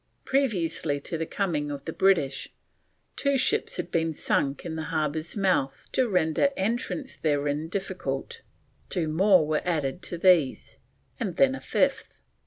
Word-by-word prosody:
Previously 180 - 0
to 165 - -3
the 165 0 -2
coming 160 -7 -1
of 140 -1 -6
the 160 - -4
British, 145 -9 +2 0.7
two 280 -1 +1
ships 435 - +1
had - - -4
been 165 -1 0
sunk 140 +5 0
in 165 -2 -4
the 160 -1 -4
harbour's 155 +3 -2
mouth 160 -9 +1
to 255 -2 +1
render 180 - +2
entrance 240 +7 -2
therein 145 0 0
difficult; 185 -8 -4 0.5
two 165 -3 -1
more 180 +1 +4
were 155 0 0
added 160 -1 -1
to 175 - -5
these, 170 -6 +2 0.4
and - - -3
then - - +5
a - - -5
fifth. - - -1
165 Hz, 150 wpm, -27 LUFS, 150-195 Hz, 0.7 s, then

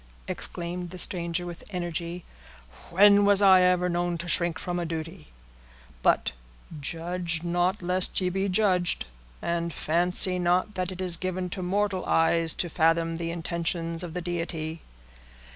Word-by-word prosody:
exclaimed 175 0 -4
the 185 - -8
stranger, 175 -1 -1
with 175 -1 -8
energy, 175 -1 -4 0.6
"when 200 +3 +6
was 200 -1 +5
I 190 -2 +7
ever 180 0 +3
known 175 0 -1
to 170 +1 -6
shrink 170 -1 +1
from 175 +1 -3
a - - -1
duty? 165 +1 -6 0.7
But - - +2 0.5
'judge 170 +2 -3
not 175 +3 0
lest 180 +1 +2
ye 185 -1 0
be 195 +2 -1
judged,' 185 -3 +1 0.4
and 170 0 -1
fancy 180 +4 +1
not 180 +4 +1
that 185 -1 -2
it 185 0 -7
is 180 -2 +3
given 185 -1 -3
to 185 - -4
mortal 190 +1 0
eyes 165 0 +2
to 175 - -1
fathom 165 0 +1
the 165 0 -3
intentions 170 0 -2
of 170 -1 -7
the 180 - -2
Deity." 165 -2 -4
175 Hz, 150 wpm, -27 LUFS, 170-185 Hz, 0.7 s, I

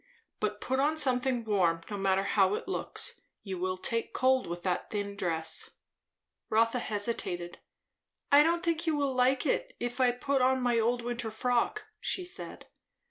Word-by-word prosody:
But 210 -1 -1
put 260 +1 0
on 300 +3 +2
something 255 -4 +1
warm, 180 -6 +2
no - - -2
matter 195 -1 +1
how 195 -1 +3
it - - -6
looks. 380 - -3 0.2
You 190 -3 -5
will 185 +1 -1
take 230 +5 -2
cold 260 0 +2
with 175 +1 -5
that 180 -2 -1
thin 205 -1 -3
dress." 165 -5 -1 0.7
Rotha 230 +3 +3
hesitated. 205 -6 -3 0.7
"I 285 +1 +9
don't 335 +3 +2
think 335 -1 0
you 320 - +3
will 280 -2 0
like 255 +1 +2
it, - - 0
if 245 +2 -2
I 250 - +5
put 260 +3 0
on 260 +1 +3
my 245 -2 +2
old 240 +2 +1
winter 240 -1 -3
frock," 245 - 0 0.2
she 370 - -1
said. 355 - -8
240 Hz, 170 wpm, -30 LUFS, 200-265 Hz, 0.7 s, I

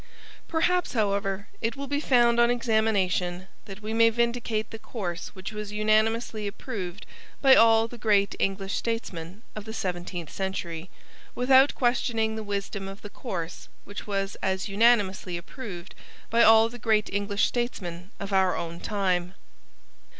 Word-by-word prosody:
Perhaps, 355 +2 +1
however, 200 -2 0
it 230 +3 -1
will 280 0 -5
be 285 +1 -1
found 240 -4 +4
on 235 0 +5
examination 205 -6 +1 0.2
that 205 0 -10
we 215 +1 -3
may 230 0 +6
vindicate 235 -2 -1
the 225 - -7
course 180 -7 -5
which 190 +3 -7
was 210 -1 -5
unanimously 215 +1 +1
approved 200 -3 -6 0.3
by 270 -2 +7
all 225 -2 +6
the 240 +1 -11
great 205 -2 +3
English 195 0 -1
statesmen 200 -4 -4
of 215 - -6
the 220 +1 -7
seventeenth 175 -3 -4
century, 180 -3 -4 0.5
without 265 +2 +5
questioning 235 -3 +1
the 220 - -4
wisdom 200 -1 -4
of 195 +1 -9
the 205 - -8
course 175 -9 -6
which 205 +1 -8
was 195 -1 -2
as 190 -1 -1
unanimously 200 -4 +2
approved 180 -1 -8 0.4
by 230 +1 +4
all 225 0 +7
the 245 +1 -10
great 215 -1 +2
English 205 0 +1
statesmen 185 -8 -3
of 200 0 -5
our 190 -1 +3
own 170 0 -5
time. 185 -3 -1
210 Hz, 150 wpm, -27 LUFS, 190-230 Hz, 0.5 s, by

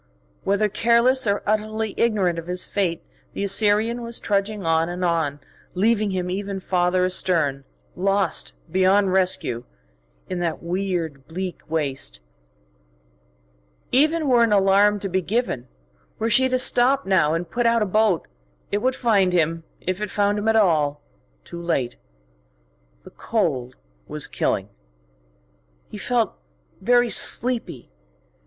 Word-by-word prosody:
Whether 200 +2 +1
careless 235 +4 +2
or 200 0 0
utterly 215 0 -1
ignorant 195 -7 +1
of 165 - -10
his 180 0 -1
fate, 175 -5 -2 0.3
the - - -3
Assyrian 210 +4 +2
was 235 0 -2
trudging 200 -1 -1
on 165 +1 +2
and 180 +1 -3
on, 160 -4 0 0.4
leaving 215 +2 +2
him 185 -2 -2
ever 195 +1 -4
farther 180 0 +1
astern, 165 -7 0 0.3
lost 195 -1 0 0.2
beyond 190 +1 +3
rescue 185 -10 0 0.6
in 185 - -4
that 170 -2 -3
weird, 170 -6 -3
bleak 180 +2 -5
waste. 135 - -2 1.7
Even 305 +4 +2
were 245 -3 +4
an 230 -2 +3
alarm 200 +1 +4
to 195 - -2
be 190 0 0
given, 190 - -2 0.5
were 225 +1 -1
she 260 +4 +5
to 255 - +1
stop 255 +2 +2
now 165 -5 +2
and 165 0 -4
put 240 -1 +1
out 230 -1 +3
a - - 0
boat, 210 -3 +1 0.4
it 205 - +1
would 255 +4 0
find 200 -7 +2
him, 165 -1 +1 0.2
if 185 +2 -3
it 210 - -2
found 205 +1 +1
him 210 - -3
at 225 - +3
all, 155 -8 +2 0.4
too 170 - -8
late. 135 -8 -1 1.1
The - - -13
cold 135 - -2 0.3
was - - -2
killing. - - -1 1.2
He 210 - -7
felt 235 -1 0 0.5
very 245 +3 +3
sleepy. 235 - +1
195 Hz, 135 wpm, -22 LUFS, 170-220 Hz, 1.7 s, she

